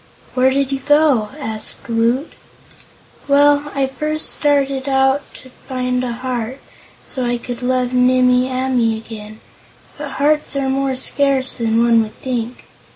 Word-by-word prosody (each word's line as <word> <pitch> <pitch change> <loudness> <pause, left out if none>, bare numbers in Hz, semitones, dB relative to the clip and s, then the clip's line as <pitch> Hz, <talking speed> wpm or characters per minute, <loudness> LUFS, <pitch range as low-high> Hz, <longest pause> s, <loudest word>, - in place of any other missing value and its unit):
"Where 255 0 +4
did 275 0 0
you 270 - -1
go?" 290 -6 +3
asked 220 -6 -5
Woot. 235 +5 0 0.9
"Well, 290 +1 +4
I 275 -1 +2
first 305 +4 -2
started 275 -2 0
out 270 +1 +3
to 260 - -13
find 250 -1 -3
a 245 - -2
heart, 250 +1 -4 0.5
so 260 - -3
I 240 0 0
could 240 0 -7
love 250 0 0
Nimmie 250 0 +4
Amee 255 -3 +1
again; 215 -1 -10 0.6
but 290 -2 -5
hearts 300 +1 +1
are 275 -1 0
more 270 0 0
scarce 265 0 0
than 230 -1 +2
one 230 -1 +5
would 215 -1 -5
think. 245 -2 -4
255 Hz, 145 wpm, -18 LUFS, 240-275 Hz, 0.9 s, one